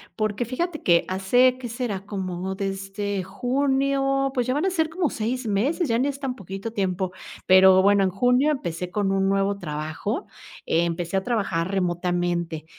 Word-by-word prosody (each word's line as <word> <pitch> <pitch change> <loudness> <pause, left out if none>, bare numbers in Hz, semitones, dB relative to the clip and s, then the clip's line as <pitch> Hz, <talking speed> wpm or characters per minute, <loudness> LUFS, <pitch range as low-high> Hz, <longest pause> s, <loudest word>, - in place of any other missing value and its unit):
porque 215 +1 -1
fíjate 310 +6 -3
que 170 -1 +3
hace, 245 +7 +3
¿que 245 -2 -6
será?, 230 -5 -3
como 190 -2 -4
desde 195 +1 -3
junio, 270 +5 0
pues 250 -3 0
ya 255 - 0
van 300 +5 0
a 385 - +1
ser 320 -3 0
como 335 -1 -1
6 245 +3 -2
meses, 270 - 0
ya 230 -1 +1
ni 265 - +2
es 280 -1 -4
tan 270 -3 -3
poquito 195 +2 -7
tiempo, 190 -3 -1 0.3
pero 190 0 +7
bueno, 200 0 +4
en 190 - +2
junio 250 +9 +2
empecé 180 - -3
con 200 +1 0
un 195 0 +1
nuevo 195 0 +1
trabajo, 155 - -4 0.4
empecé 170 +2 0
a 190 - -1
trabajar 190 -7 -1
remotamente 175 -3 -1
200 Hz, 170 wpm, -24 LUFS, 185-255 Hz, 0.4 s, pero